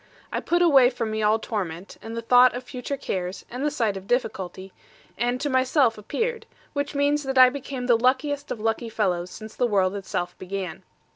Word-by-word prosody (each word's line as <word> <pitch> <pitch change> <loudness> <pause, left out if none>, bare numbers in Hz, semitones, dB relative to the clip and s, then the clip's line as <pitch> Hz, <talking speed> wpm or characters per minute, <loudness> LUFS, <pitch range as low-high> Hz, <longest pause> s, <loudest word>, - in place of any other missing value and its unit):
I - - -1
put 345 +1 +1
away 270 -7 +6
from 235 -3 -3
me 220 0 -2
all 215 +1 +4
torment, 190 -5 -5
and 225 +1 -7
the 230 - -4
thought 250 +1 +6
of 250 - -5
future 255 +2 -5
cares, 185 -7 -4
and 250 +3 -4
the 300 - +2
sight 230 -8 0
of 195 0 -8
difficulty; 190 -6 -2 0.4
and 245 +1 0
to 285 - -1
myself 260 -2 +3
appeared, 455 - -3 0.3
which 285 0 -2
means 285 +1 +2
that 270 -2 -3
I 255 -1 +9
became 270 -2 -5
the 245 -1 +5
luckiest 275 +4 +1
of 230 - -4
lucky 225 +2 -1
fellows, 185 -5 -1
since 220 +2 -10
the 245 - +1
world 195 -4 +2
itself 180 -3 -3
began. 185 -3 -5
240 Hz, 200 wpm, -25 LUFS, 200-270 Hz, 0.4 s, I